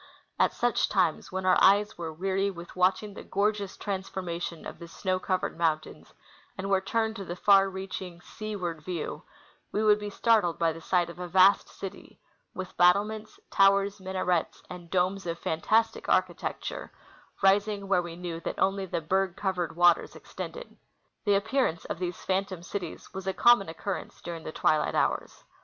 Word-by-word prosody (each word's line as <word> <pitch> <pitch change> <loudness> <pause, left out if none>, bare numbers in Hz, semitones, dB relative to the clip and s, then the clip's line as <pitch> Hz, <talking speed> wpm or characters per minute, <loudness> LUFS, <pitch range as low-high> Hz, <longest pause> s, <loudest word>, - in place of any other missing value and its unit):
At - - +4
such - - +1
times, - - +1
when 190 0 -3
our 185 - +5
eyes 205 +2 +5
were 165 -2 -5
weary 190 +4 0
with 175 -2 -9
watching 185 +3 +1
the - - -9
gorgeous 205 0 -1
transformation 185 -4 -4
of - - -8
the 170 - -9
snow 185 +2 -2
covered 185 0 -1
mountains 155 -2 -1 0.5
and 195 +1 -3
were 190 -1 +4
turned 220 +3 -1
to 200 - -5
the 175 -1 -5
far 195 +1 +5
reaching 190 -2 -6
seaward 180 -5 -5
view, 170 0 -4 0.5
we 210 - 0
would 210 -1 +5
be 210 0 -5
startled 205 -5 +2
by 165 -1 +2
the 165 - -10
sight 175 0 +1
of 170 - -14
a 180 - -4
vast 190 +3 +5
city, 195 0 -9 0.4
with 185 -1 -6
battlements, 210 +4 +2
towers, 200 0 +4
minarets, 185 -2 -1
and 175 -2 -9
domes 185 +1 0
of 170 0 -2
fantastic 220 +9 0
architecture, - - -1 0.5
rising 200 +1 +3
where 190 -2 +3
we 170 -1 -7
knew 170 -1 -5
that - - -5
only 195 0 +1
the 165 - -2
berg 190 +3 0
covered 185 -4 -2
waters 175 0 +4
extended. - - -8 0.5
The 205 -1 +4
appearance 220 -4 0
of - - -5
these 180 -1 -3
phantom 190 -2 -2
cities 180 -2 -6
was 190 0 -6
a 190 - +1
common 235 -3 +5
occurrence 190 +4 -5
during 170 -1 -7
the - - -4
twilight 155 -1 +1
hours. - - -1
190 Hz, 170 wpm, -28 LUFS, 175-200 Hz, 0.5 s, our